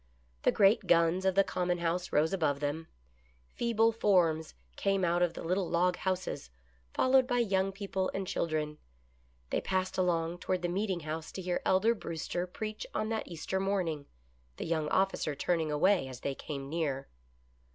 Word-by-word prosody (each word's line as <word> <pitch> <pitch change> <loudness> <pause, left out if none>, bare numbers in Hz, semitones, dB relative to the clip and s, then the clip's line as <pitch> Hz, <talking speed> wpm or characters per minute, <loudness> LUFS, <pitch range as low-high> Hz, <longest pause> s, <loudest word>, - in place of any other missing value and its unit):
The - - +4
great 200 +1 +4
guns 170 +2 +3
of 190 -1 +2
the 195 - +6
Common 180 -2 -1
House 170 +1 -1
rose 155 +4 +2
above 155 -7 +1
them. 150 +3 -2 0.7
Feeble 230 -1 +2
forms 175 -8 +2 0.2
came 195 -2 +1
out 175 +1 +2
of 175 -2 +2
the - - -6
little 180 +2 0
log 180 +1 +2
houses, 185 - -3 0.4
followed 260 0 +4
by 245 -2 +1
young 195 -4 +2
people 195 -1 -2
and 195 0 -3
children. 155 -4 -2 0.7
They - - +1
passed 185 0 -1
along 170 -1 +1
toward 185 0 -1
the - - +2
meeting 190 -1 -1
house 155 +1 -5
to 190 - -5
hear 180 0 -1
Elder 200 +5 +4
Brewster 175 -2 -4
preach 215 +3 -5
on 215 - 0
that 225 -1 -2
Easter 175 +3 -3
morning, 180 -7 -1 0.5
the - - -4
young 160 -2 0
officer 190 -6 +1
turning 160 +1 0
away 170 +1 +3
as 130 -1 -9
they 140 - -1
came 140 0 -6
near. 140 -3 -2
180 Hz, 170 wpm, -31 LUFS, 160-195 Hz, 0.7 s, the